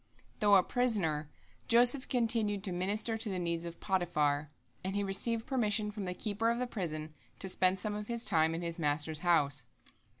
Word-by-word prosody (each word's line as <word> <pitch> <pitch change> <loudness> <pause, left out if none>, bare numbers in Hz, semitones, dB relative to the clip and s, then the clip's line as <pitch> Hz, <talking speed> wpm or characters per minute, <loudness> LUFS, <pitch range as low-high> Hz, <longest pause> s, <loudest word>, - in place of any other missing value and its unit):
Though 205 -2 +5
a 190 - +5
prisoner, 180 -13 -1 0.4
Joseph 245 +3 +5
continued 225 -5 +1
to 195 - +2
minister 210 +5 -1
to 220 - +2
the 190 - -3
needs 170 -1 -3
of 170 0 -8
Potiphar, 150 -6 0 0.3
and 190 +1 -3
he 205 - 0
received 225 +4 0
permission 215 -5 0
from 205 -2 -6
the 180 0 -4
keeper 215 +3 -1
of 235 - 0
the 250 - -1
prison 155 -9 -5 0.2
to 195 - 0
spend 185 0 +2
some 210 +2 0
of 210 0 -6
his 235 0 -3
time 160 -3 +2
in 170 - -5
his 170 0 -4
master's 150 0 +1
house. 145 -7 +2
195 Hz, 190 wpm, -32 LUFS, 165-225 Hz, 0.4 s, Though